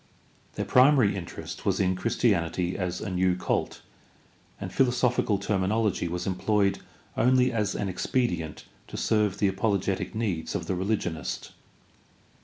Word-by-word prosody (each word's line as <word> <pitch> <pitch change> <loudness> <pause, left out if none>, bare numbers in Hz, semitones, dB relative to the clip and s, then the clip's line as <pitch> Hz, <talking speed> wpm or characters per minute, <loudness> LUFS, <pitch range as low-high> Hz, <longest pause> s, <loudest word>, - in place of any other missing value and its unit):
Their - - -2
primary 125 -6 +5
interest 90 -4 -7
was - - +1
in 95 -1 +2
Christianity 90 -5 0
as 90 -2 -3
a 105 - -4
new 90 0 +2
cult, 90 - -2 0.8
and - - -6
philosophical 125 -4 +2
terminology 100 0 0
was 90 +1 -3
employed 100 +1 +1 0.4
only 125 +1 +3
as 105 -4 -1
an 100 - -2
expedient 90 - -2 0.2
to - - -7
serve 105 -3 +1
the 100 - +2
apologetic 100 +1 -1
needs 95 -8 -2
of - - -2
the - - -1
religionist. 90 -3 -2
100 Hz, 130 wpm, -27 LUFS, 90-110 Hz, 0.8 s, primary